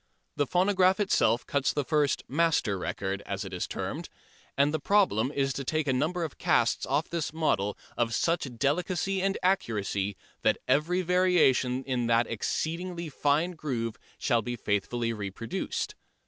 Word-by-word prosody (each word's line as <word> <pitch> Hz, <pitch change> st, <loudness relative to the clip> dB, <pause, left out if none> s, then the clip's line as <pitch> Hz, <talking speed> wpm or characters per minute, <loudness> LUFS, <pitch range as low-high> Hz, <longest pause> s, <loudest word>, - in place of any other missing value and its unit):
The 145 Hz, -1 st, +1 dB
phonograph 185 Hz, +2 st, +3 dB
itself 190 Hz, -, +2 dB
cuts 140 Hz, -1 st, +1 dB
the 145 Hz, -, -1 dB
first 145 Hz, +1 st, +1 dB
"master" 150 Hz, -8 st, +2 dB
record, 95 Hz, +1 st, -3 dB
as 100 Hz, 0 st, -3 dB
it 95 Hz, -, -8 dB
is 90 Hz, -, -2 dB
termed, -, -, -4 dB, 0.5 s
and 140 Hz, +2 st, +3 dB
the 155 Hz, -, 0 dB
problem 145 Hz, -, +2 dB
is 135 Hz, -2 st, 0 dB
to 140 Hz, -, -4 dB
take 155 Hz, +2 st, -1 dB
a 135 Hz, -, +2 dB
number 160 Hz, +7 st, 0 dB
of 160 Hz, -, -6 dB
casts -, -, +2 dB
off -, -, +1 dB
this 170 Hz, -3 st, -2 dB
model 105 Hz, -11 st, 0 dB, 0.2 s
of 120 Hz, -1 st, 0 dB
such 165 Hz, -8 st, 0 dB
delicacy 180 Hz, -, 0 dB
and 195 Hz, +1 st, +1 dB
accuracy 105 Hz, -, 0 dB, 0.2 s
that -, -, +3 dB
every 160 Hz, +8 st, +2 dB
variation 165 Hz, -8 st, +3 dB
in 125 Hz, -3 st, -1 dB
that 115 Hz, 0 st, +3 dB
exceedingly 170 Hz, -, -3 dB
fine 150 Hz, +5 st, +1 dB
groove 125 Hz, -9 st, -3 dB, 0.2 s
shall 120 Hz, -4 st, +2 dB
be 120 Hz, +2 st, -4 dB
faithfully 115 Hz, +2 st, -1 dB
reproduced. 105 Hz, +1 st, -4 dB
140 Hz, 155 wpm, -28 LUFS, 115-170 Hz, 0.5 s, phonograph